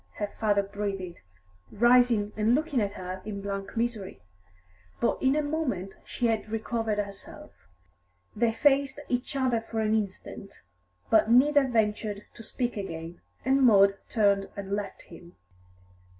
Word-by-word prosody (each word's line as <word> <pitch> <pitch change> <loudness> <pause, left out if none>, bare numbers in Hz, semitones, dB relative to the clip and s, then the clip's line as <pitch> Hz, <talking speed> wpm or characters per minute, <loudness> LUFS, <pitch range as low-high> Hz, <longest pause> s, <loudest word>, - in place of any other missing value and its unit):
her 205 -1 -4
father 205 -2 +2
breathed, 195 -3 -5 0.5
rising 240 -2 +4
and 215 +3 +3
looking 295 -4 0
at 200 -1 -1
her 185 -1 -6
in 205 -2 -5
blank 200 +2 -5
misery. 225 -5 -2 0.8
But - - 0
in 265 +1 +3
a 305 - +1
moment 270 - -2
she 245 - -3
had 225 -2 0
recovered 225 -1 -2
herself. 200 -1 -6 0.8
They 235 -1 +2
faced 275 +3 +2
each 250 +3 -2
other 255 -4 +1
for 225 0 -5
an 215 0 +1
instant, 200 -1 -4 0.5
but 220 - +5
neither 275 +3 +5
ventured 210 -3 -1
to - - -12
speak 240 +1 -3
again, 165 -3 -6 0.2
and 270 +1 +3
Maud 200 -5 +5
turned 200 -3 +2
and 200 -1 -6
left 205 0 -4
him. 175 0 -14
215 Hz, 140 wpm, -28 LUFS, 200-245 Hz, 0.8 s, but